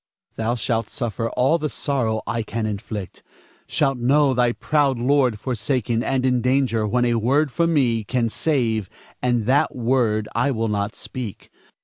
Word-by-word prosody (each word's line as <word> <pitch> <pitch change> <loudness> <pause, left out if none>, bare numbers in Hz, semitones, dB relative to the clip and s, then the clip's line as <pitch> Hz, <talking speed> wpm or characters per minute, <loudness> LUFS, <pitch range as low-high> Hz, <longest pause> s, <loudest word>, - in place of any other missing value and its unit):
Thou 115 +2 -1
shalt 115 -1 -1
suffer 115 0 -3
all 135 +7 +2
the 150 -1 -2
sorrow 120 -8 -1
I 115 - -1
can 110 0 -3
inflict, 105 -2 -5 0.5
shalt 135 -4 0
know 135 +3 +3
thy 125 -1 +2
proud 140 0 +1
lord 125 -3 +2
forsaken 115 0 -1
and 130 0 0
in 125 -1 +2
danger 125 -4 +1
when 125 +3 +1
a 120 - +2
word 135 +6 +2
from 170 +4 +1
me 120 -6 +2
can 120 +2 0
save, 115 - 0 0.3
and 120 -3 +1
that 135 +5 +2
word 115 -4 +1
I 120 +4 +1
will 115 -4 -1
not 100 +1 -2
speak. 120 -6 -8
120 Hz, 160 wpm, -22 LUFS, 110-135 Hz, 0.5 s, know